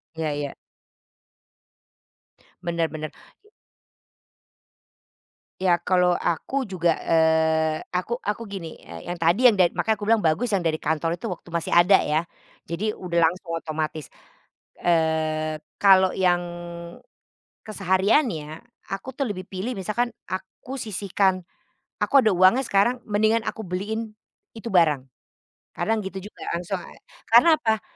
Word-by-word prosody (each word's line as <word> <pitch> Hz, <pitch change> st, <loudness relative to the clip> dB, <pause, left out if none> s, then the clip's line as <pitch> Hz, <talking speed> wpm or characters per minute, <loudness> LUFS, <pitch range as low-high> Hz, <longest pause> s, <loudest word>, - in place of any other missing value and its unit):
Ya 155 Hz, -2 st, -2 dB
ya. 145 Hz, -1 st, -4 dB, 2.1 s
Bener 170 Hz, -1 st, -1 dB
bener, 155 Hz, 0 st, -6 dB, 0.3 s
i -, -, -23 dB, 2.1 s
Ya, 175 Hz, -2 st, +4 dB
kalo 180 Hz, 0 st, +2 dB
aku 260 Hz, +10 st, -1 dB
juga, 175 Hz, -4 st, 0 dB
eee, 160 Hz, -1 st, +2 dB, 0.2 s
aku 230 Hz, +7 st, -1 dB
aku 210 Hz, +3 st, -3 dB
gini, 170 Hz, -5 st, -6 dB, 0.3 s
yang 175 Hz, -, -3 dB
tadi 175 Hz, +9 st, +3 dB, 0.2 s
makanya 220 Hz, -, 0 dB
aku 210 Hz, -, -15 dB
bilang 225 Hz, +2 st, +3 dB
bagus, 205 Hz, +7 st, +1 dB
yang 185 Hz, -4 st, 0 dB
dari 155 Hz, -1 st, -1 dB
kantor 160 Hz, +2 st, 0 dB
itu, 175 Hz, -, -5 dB
waktu 175 Hz, -, -7 dB
masih 170 Hz, -, -2 dB
ada 175 Hz, +3 st, +6 dB
ya. 155 Hz, +3 st, 0 dB, 0.4 s
Jadi 205 Hz, +6 st, -2 dB
udah 170 Hz, -4 st, -1 dB
langsung 165 Hz, +1 st, 0 dB
otomatis, 155 Hz, -2 st, -4 dB, 0.7 s
eee, 160 Hz, -2 st, +1 dB, 0.2 s
kalo 190 Hz, -2 st, +6 dB
yang 175 Hz, -2 st, +2 dB, 1.2 s
kesehariannya, 190 Hz, -, 0 dB, 0.3 s
aku 220 Hz, +7 st, -5 dB
tuh 280 Hz, -, -1 dB
lebih 185 Hz, -1 st, -7 dB
pilih 195 Hz, +6 st, -4 dB
misalkan, 235 Hz, +5 st, -1 dB, 0.2 s
aku 190 Hz, +8 st, -7 dB
sisihkan 195 Hz, -5 st, -1 dB, 0.5 s
aku 275 Hz, -2 st, +5 dB
ada 220 Hz, -, +3 dB
uangnya 185 Hz, +8 st, +5 dB
sekarang 215 Hz, +6 st, +2 dB
mendingan 220 Hz, +2 st, +2 dB
aku 215 Hz, +1 st, -4 dB
beliin 215 Hz, +5 st, -4 dB, 0.4 s
itu 230 Hz, +1 st, -6 dB
barang. 150 Hz, -7 st, +3 dB, 0.7 s
Kadang 225 Hz, 0 st, +1 dB
gitu 190 Hz, 0 st, -6 dB
juga -, -, -19 dB
langsung, 180 Hz, +3 st, -2 dB, 0.5 s
karena 280 Hz, +8 st, +7 dB
apa? 220 Hz, -2 st, 0 dB
185 Hz, 120 wpm, -24 LUFS, 165-215 Hz, 2.1 s, karena